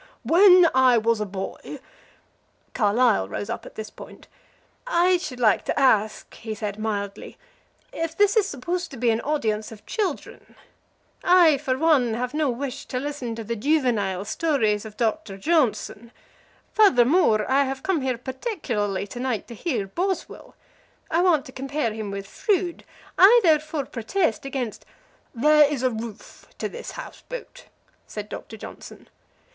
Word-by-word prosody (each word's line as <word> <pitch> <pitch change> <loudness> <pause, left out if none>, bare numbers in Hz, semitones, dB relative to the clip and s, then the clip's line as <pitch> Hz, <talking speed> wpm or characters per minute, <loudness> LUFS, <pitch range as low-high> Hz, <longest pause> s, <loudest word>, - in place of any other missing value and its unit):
When 360 0 +7
I 255 -2 +5
was 225 -1 +1
a 210 - -2
boy 195 0 -7 0.4
" - - -41
Carlyle 220 - +2
rose 105 0 -4
up - - -6
at - - -14
this 220 -1 -7
point. - - -13 0.6
"I 365 -5 +3
should 305 -8 -7
like 215 -5 +3
to - - -1
ask," 215 -5 +2
he 220 -1 -6
said, 210 -1 -5
mildly, 205 -2 -4 0.6
"if 330 0 -4
this 410 +1 +4
is 425 -3 +3
supposed 350 +5 -3
to 270 - -10
be 235 0 +2
an 225 +1 0
audience 220 -8 -1
of 215 -2 -13
children? 390 -9 -4 0.7
I, 345 -5 +5
for 260 -3 -1
one, 270 -7 +3
have 250 +2 -3
no 305 -2 +1
wish 265 +2 -5
to 250 - -4
listen 265 -4 -4
to 225 - -6
the 235 +2 -3
juvenile 225 -8 0
stories 220 -5 0
of 215 -1 -10
Doctor 220 -3 -2
Johnson. 235 - 0 0.6
Furthermore, 260 - +4
I 275 +1 +3
have 270 0 -5
come 375 -6 0
here 260 -2 -1
particularly 245 - -3
to 225 +4 -9
night 245 -5 -2
to - - -7
hear 235 - -2
Boswell. 365 - -4 0.6
I 330 +2 +3
want 340 -6 +3
to - - -11
compare 270 -3 -2
him 215 -2 -5
with 200 0 -5
Froude. 360 - -1 0.3
I 425 +6 +8
therefore 310 -3 +2
protest 320 - -1
against 255 -5 -4 0.3
" - - -35
"There 300 +3 +5
is 270 -4 -3
a 255 - +2
roof 225 -2 -9
to - - -2
this 485 - -8
house - - -9
boat," - - -8 0.4
said 210 -1 -7
Doctor 220 - -8
Johnson. - - -11
255 Hz, 160 wpm, -24 LUFS, 220-315 Hz, 0.7 s, I